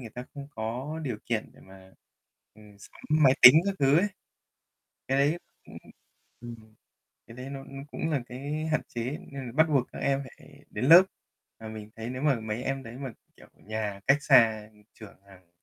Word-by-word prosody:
người 115 -3 -9
ta 125 +2 -8
không 140 0 -9
có 125 +6 -5
điều 120 -5 -3
kiện 115 -2 -2
để - - -19
mà, 95 0 -17 0.6
ừm, 105 -1 -17
sắm - - -16
máy 150 -4 +5
tính 125 - +12
các 200 - 0
thứ 140 +2 +4
ấy. 205 +4 +1 1.0
Cái 135 +1 +1
đấy 150 +5 +2 0.3
ưm, - - -13 0.6
ừm, 115 -2 -11 0.5
cái 115 +2 -13
đấy 130 +2 -8
nó 135 -1 -7
nó 135 0 -10
cũng 160 - -3
là 145 -4 0
cái 145 +5 -5
hạn 155 - +2
chế 120 -1 -5 0.3
nên 135 -2 -6
là 120 - -8
bắt 160 +2 +4
buộc 135 -5 +1
các - - -9
em 140 0 0 0.2
phải - - -18
đến - - -4
lớp. 170 +4 +10 0.6
Mà 110 - -8
mình 110 -1 -9
thấy 115 +1 -6
nếu 130 +1 -6
mà 140 -6 +2
mấy 110 +2 -4
em 135 0 -3
đấy 115 -2 -10
mà, 135 -3 -6 0.2
kiểu, - - -17
nhà 105 -2 -5
cách 140 +2 +5
xa 110 -6 +4 0.3
trường 105 -3 -13
hàng 95 -3 -19
125 Hz, 200 wpm, -27 LUFS, 110-140 Hz, 1.0 s, tính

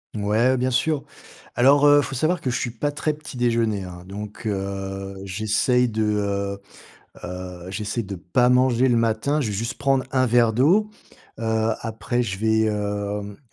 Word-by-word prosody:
Mouais, 110 +5 +2
bien 130 +1 0
sûr. 155 +2 +1 0.5
Alors, 140 +4 +5
heu, 145 0 +7
faut 135 0 -5
savoir 160 +7 0
que 130 - -2
je 125 - -1
suis 120 - -2
pas 145 +5 -2
très 150 +1 -1
petit-déjeuner, 120 -8 -1
hein. 90 -1 -9
Donc, 105 +3 -7
heu, 95 -1 -4
j'essaie 110 +5 +1
de, 110 -1 -1
heu 100 -1 -1 0.7
heu, 90 0 -7
j'essaie 105 +4 -3
de 100 -1 -6
pas 95 +8 +1
manger 125 0 +3
le 120 - +3
matin. 115 +7 +1
Je 125 - -1
vais 105 - -3
juste 115 +5 -3
prendre 135 -1 +2
un 130 -1 +3
verre 120 -1 +4
d'eau. 180 - +3 0.5
Heu, 110 0 0
après, 110 +1 -2
je 95 -5 -4
vais, 110 0 +2
hem, 105 -1 -3
110 Hz, 170 wpm, -23 LUFS, 100-125 Hz, 0.7 s, heu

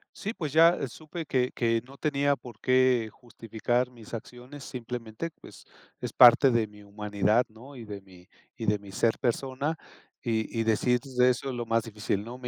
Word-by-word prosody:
Sí, 215 +3 -4
pues 155 - -4
ya 165 -3 +5
supe 155 +6 -8
que 125 -2 0
que 115 -1 +1
no 135 +1 -14
tenía 145 -2 +1
por 120 -4 -13
qué 130 -3 +3
justificar 120 +1 -2
mis 115 -2 -14
acciones, 125 +4 -8
simplemente, 120 +4 -6
pues, - - -14 0.4
es - - -4
parte 125 +2 +8
de 115 -2 +2
mi 105 0 -16
humanidad, 105 +3 +1
¿no? 125 +6 -14
Y 115 -3 -9
de 100 -2 -7
mi 90 -2 -18 0.3
y - - -4
de 105 0 +2
mi 100 -1 -12
ser 115 +3 +1
persona, 135 +5 -1 0.5
y 115 0 -1
y - - +2
decir 120 +3 +2
de: 125 -2 +2
"Eso 125 +2 -1
es 125 - -4
lo 120 -1 -3
más 115 0 +2
difícil, 105 -2 -3
no, 120 +3 -8
me 125 - -6
120 Hz, 190 wpm, -28 LUFS, 110-130 Hz, 0.5 s, parte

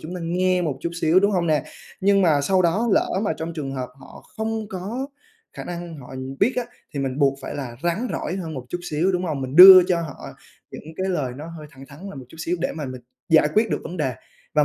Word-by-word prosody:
chúng 170 +4 -7
ta 180 - -5
nghe 180 +1 +1
một 150 -5 -2
chút 170 - -3
xíu, 165 +4 +4
đúng 200 +1 +3
hông 175 -3 0
nè? 150 -3 +1 0.4
Nhưng 195 0 +3
mà 155 -5 +3
sau 185 +5 +2
đó, 200 +8 +1
lỡ - - +3
mà 205 - 0
trong 165 +1 -5
trường 140 -4 -4
hợp 130 -2 -4
họ - - -13
không 220 -1 -3
có 210 +9 -4 0.5
khả - - -8
năng 175 -1 -6
họ 130 0 -11 0.3
biết 235 +6 +4
á, 250 - 0 0.3
thì 140 - -2
mình 135 0 -3
buộc 140 -1 +2
phải - - -6
là 130 -5 -6
rắn 185 +9 -1
rỏi 175 +5 -3
hơn 165 -4 -5
một 130 -2 -6
chút 175 - -3
xíu, 170 +6 +1
đúng 180 0 -1
hông? 150 -5 -3
Mình 130 +3 -5
đưa 185 0 +12
cho 175 -2 +2
họ 160 -4 -6 0.5
những 160 +2 -10
cái 190 0 -2
lời 145 -9 -1
nó 150 +3 -8
hơi 150 - -10
thẳng 135 -1 -14
thắn 140 +2 -14
là - - -10
một 135 -2 -9
chút 160 - -15
xíu 175 +2 -1
để - - -1
mà 155 -2 -5
mình 130 -1 -7 0.3
giải 155 -2 +5
quyết 225 +1 +3
được - - -1
vấn 180 - -7
đề. 135 -5 -1 0.4
Và 150 -1 +4
170 Hz, 260 wpm, -23 LUFS, 145-185 Hz, 0.5 s, đưa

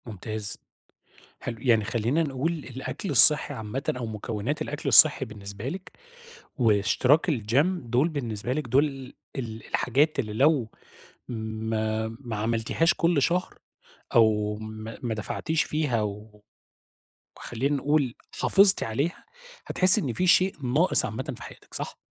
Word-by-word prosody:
ممتاز، 110 -1 -5 0.8
حلو 120 - -6
يعني 115 -4 +2
خلّينا 120 +9 -1
نقول 145 +2 -2
الأكل 150 - -6
الصحّي 150 -1 +8
عامةً 110 +2 -6
أو 125 -2 -5
مكونات 110 +5 -4
الأكل 150 +1 -5
الصحّي 150 -3 +7
بالنسبة 105 0 -8
لِك، 185 +6 -8 0.7
واشتراك 125 - +2
الgym 125 +2 +1 0.2
دوُل 130 +7 +2
بالنسبة 125 -6 -4
لِك، 145 -1 -4
دوُل 135 +6 +3 0.5
ال 115 -4 -7
الحاجات 145 +5 0
اللي 110 -6 -3
لو 130 -1 +1 0.6
ما 110 -1 -3
ما 120 -5 -6
عملتيهاش 115 +9 0
كل 170 -3 0
شهر، 180 +6 -1 0.6
أو 105 -2 +2
ما، 110 +1 -9
ما 120 -2 -2
دفعتيش 155 +9 -2
فيها 145 -7 -2
و 105 0 -8 0.9
وخلّينا 135 +5 -3
نقول 140 -3 -1 0.3
حافظتِ 195 0 +5
عليها، 140 +10 -4 0.4
هتحسّي 185 +4 +4
إن 130 -8 -3
في 180 +10 -1
شيء 185 +2 +4
ناقص 140 +9 +4
عامةً 130 +6 -6
في - - -11
حياتِك، - - -14
صح؟ - - -4
125 Hz, 130 wpm, -25 LUFS, 110-150 Hz, 0.9 s, الصحّي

